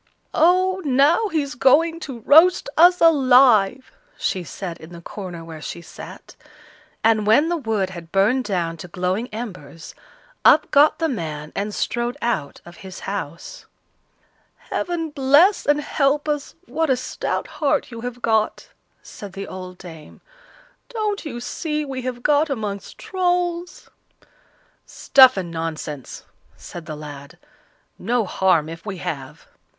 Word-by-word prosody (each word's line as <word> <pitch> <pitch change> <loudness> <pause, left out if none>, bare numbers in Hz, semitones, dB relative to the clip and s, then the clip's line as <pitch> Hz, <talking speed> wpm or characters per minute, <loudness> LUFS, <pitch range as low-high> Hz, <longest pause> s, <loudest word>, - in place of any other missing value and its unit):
"Oh! 370 +3 +3
now 290 - +3
he's 295 -7 -2
going 325 +7 +3
to 265 -7 -8
roast 325 +9 +5
us 355 +2 +6
alive," 260 -7 +4 0.3
she 185 - -2
said, 175 -1 -7
in 160 +2 -12
the 170 - -9
corner 175 -3 -8
where 160 -2 -9
she 170 - -6
sat. - - -12 0.7
And 220 -2 +3
when 285 +10 +4
the 345 - 0
wood 220 - -2
had 170 -2 -10
burned 215 +7 +2
down 170 -4 -2
to 170 - -9
glowing 185 +6 -2
embers, 180 - -8 0.5
up 305 - +5
got 295 +1 +5
the 325 - 0
man 155 - -5
and 205 +1 -2
strode 240 +3 -2
out 190 -12 -2
of 175 - -13
his 190 -2 -10
house. 170 -5 -6 0.9
"Heaven 330 -3 -4
bless 290 +8 +4
and 290 0 +3
help 290 +1 0
us! 295 -1 -3
what 320 -3 -1
a 260 - +3
stout 255 - -3
heart 300 -3 -1
you 230 -1 -8
have 245 0 -7
got!" 220 -1 0 0.3
said 200 -2 -10
the 195 0 -6
old 185 -1 -8
dame. 160 -5 -12 0.7
"Don't 430 -4 -2
you 240 -6 -5
see 300 +4 -3
we 265 -2 -5
have 245 -1 -5
got 295 +1 +3
amongst 210 -7 -5
Trolls?" 355 -3 -2 0.9
"Stuff 260 -4 +5
and 175 -3 -4
nonsense!" 160 -4 -6 0.3
said 170 -2 -10
the 155 - -5
lad; 145 +1 -10 0.6
"no 240 -2 0
harm 180 -4 +2
if 165 +1 -9
we 200 -3 -6
have." 135 -6 -6
235 Hz, 145 wpm, -21 LUFS, 180-300 Hz, 0.9 s, us